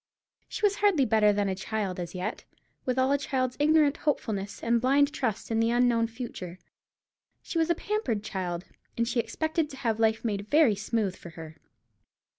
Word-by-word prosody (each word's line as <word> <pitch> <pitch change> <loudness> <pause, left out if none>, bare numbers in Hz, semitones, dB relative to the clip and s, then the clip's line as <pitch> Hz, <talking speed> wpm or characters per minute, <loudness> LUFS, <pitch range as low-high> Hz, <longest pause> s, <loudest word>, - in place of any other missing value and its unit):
She - - -7
was 405 0 +2
hardly 390 -10 +3
better 215 -2 +4
than 205 0 0
a 190 - 0
child 190 -1 -3
as 175 0 -5
yet, 185 +5 -4 0.4
with 255 0 0
all 260 +1 +3
a 285 - +3
child's 255 -3 -1
ignorant 300 -1 +4
hopefulness 205 -9 -2
and 235 0 +2
blind 280 +3 +3
trust 230 -7 -2
in 225 - +1
the 225 0 +3
unknown 240 -1 +3
future. 225 -7 -7 0.9
She 335 - -2
was 325 +1 +2
a 340 - +3
pampered 320 - -2
child, 180 -3 -4 0.3
and 235 0 +1
she 245 0 0
expected 315 +7 -1
to 270 - -10
have 225 -4 -1
life 220 +1 +2
made 205 -2 -2
very 295 -7 +5
smooth 205 -1 -1
for 170 - -11
her. 160 -1 -10
230 Hz, 185 wpm, -28 LUFS, 205-280 Hz, 0.9 s, very